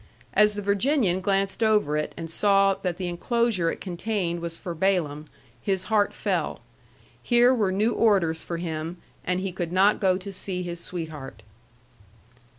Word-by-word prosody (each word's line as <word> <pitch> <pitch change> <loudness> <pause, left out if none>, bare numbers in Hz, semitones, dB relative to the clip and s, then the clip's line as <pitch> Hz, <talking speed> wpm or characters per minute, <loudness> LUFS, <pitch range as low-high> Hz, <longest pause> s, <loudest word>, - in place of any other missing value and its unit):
As 210 0 +5
the 205 - -4
Virginian 200 - +2
glanced 195 +2 0
over 210 -9 +3
it 150 0 -2
and 165 - -5
saw 195 +3 +3
that 185 -3 -3
the 185 - -3
enclosure 190 0 0
it - - -7
contained 180 -1 -2
was 170 0 -5
for 175 - -5
Balaam, 160 -4 0 0.3
his 190 -2 -1
heart 205 -1 +3
fell. - - -2 0.6
Here 240 +1 +4
were 210 -6 +1
new 210 +5 +1
orders 185 -8 +2
for 170 - -4
him, 165 0 -4 0.3
and 180 +1 0
he 190 -1 -2
could 175 -2 -4
not 195 +3 +3
go 185 -2 +3
to 195 +1 -8
see 185 -1 -4
his 175 -1 -5
sweetheart. 155 - -6
185 Hz, 160 wpm, -25 LUFS, 170-205 Hz, 0.6 s, As